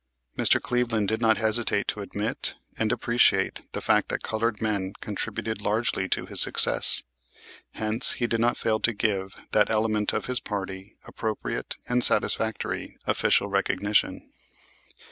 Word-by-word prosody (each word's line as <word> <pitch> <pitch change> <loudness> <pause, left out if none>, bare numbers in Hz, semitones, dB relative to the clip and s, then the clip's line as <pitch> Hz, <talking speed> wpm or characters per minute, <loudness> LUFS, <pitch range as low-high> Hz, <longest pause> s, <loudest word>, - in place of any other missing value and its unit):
Mr. - - +4
Cleveland 120 -4 -1
did 110 +1 -2
not 110 -1 +3
hesitate 110 -1 0
to 105 - -3
admit 105 +2 -2 0.2
and 110 -1 -1
appreciate 120 0 +1
the - - -3
fact - - +2
that - - -3
colored 110 0 -2
men 100 -3 -2
contributed 110 -1 -4
largely 105 -2 -1
to - - -1
his - - 0
success, - - +3 0.7
hence 110 +2 +3
he 120 - -2
did 115 -1 -1
not 120 +1 +1
fail 110 -1 0
to 115 - +1
give 100 -2 -2 0.2
that - - +3
element 110 -1 0
of - - -3
his 125 -2 0
party 95 0 -6
appropriate 110 -2 -4
and 125 0 +2
satisfactory 110 -1 +2
official 100 - +2
recognition. 100 +1 0
110 Hz, 145 wpm, -25 LUFS, 105-115 Hz, 0.7 s, Mr